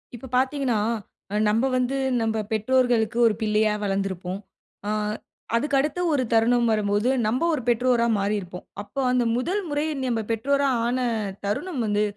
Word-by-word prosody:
இப்ப 255 +2 -10
பாத்தீங்கன்னா, 260 -3 +1 0.7
நம்ப 225 +5 +2
வந்து 255 +2 0 0.2
நம்ப 220 -1 0
பெற்றோர்களுக்கு 235 0 +2
ஒரு 220 - +2
பிள்ளையா 215 0 +2
வளர்ந்துருப்போம். 195 -2 -2 0.5
ஆ, - - -1 0.7
அதுக்கடுத்து 285 +6 +1
ஒரு 270 -3 +2
தருணம் 235 +1 +3
வரும்போது, 210 +2 +1 0.2
நம்ப 250 +8 0
ஒரு 300 - -1
பெற்றோரா 240 0 +3
மாறிருப்போம். 195 -3 -3 0.2
அப்ப 210 - -19
அந்த 250 -1 +2
முதல் 365 +11 -1
முறை 290 +1 0 0.2
நம்ப 235 -3 0
பெற்றோரா 280 +5 +1 0.2
ஆன 250 +2 0 0.5
தருணம் 260 - -2
வந்து, 210 0 +1
235 Hz, 135 wpm, -24 LUFS, 210-260 Hz, 0.7 s, தருணம்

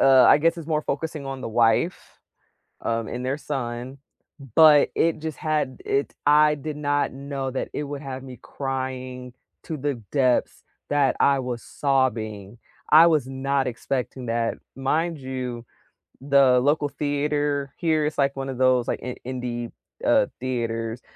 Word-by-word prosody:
a - - +4
uh, 135 -1 +7
I - - +7
guess 165 +2 +2
it's 160 - -8
more 155 -2 0
focusing 150 -1 -4
on 135 -1 -5
the 115 - -4
wife, 115 +9 +1 0.6
um, 115 -1 -1
and 125 +1 -5
their 140 +3 -1
son, 130 -2 -5 0.6
but 155 -2 +7
it 165 -1 +1
just 155 -2 -5
had 155 -4 -1
it 140 +1 -1
I 150 +1 +6
did 150 +1 -6
not 145 -2 0
know 135 0 -4
that 130 - -4
it - - -2
would 145 0 -6
have 135 -1 -6
me 130 -2 -10
crying 130 -2 -5 0.3
to 160 - -4
the 145 0 -1 0.2
depths 130 -4 +1 0.3
that 140 -3 +2
I 140 -1 +4
was 125 -2 -4
sobbing, 115 -6 -1 0.3
I 160 +2 +9
was 150 -6 +2
not 135 0 -1
expecting 125 +1 -3
that. 115 0 -1 0.2
Mind 160 +4 0
you, 130 -3 -5 0.6
the 135 -2 +5
local 145 +2 +1
theater 145 -1 -1
here 160 -3 +1
it's 150 - -3
like 140 -1 +2
one 135 0 -4
of 130 - -5
those, 130 -1 +3
like, - - -1
i 125 0 -4
indie, 120 -2 -4 0.3
uh, - - +4 0.2
theaters. 115 -2 -3
135 Hz, 160 wpm, -24 LUFS, 125-145 Hz, 0.6 s, I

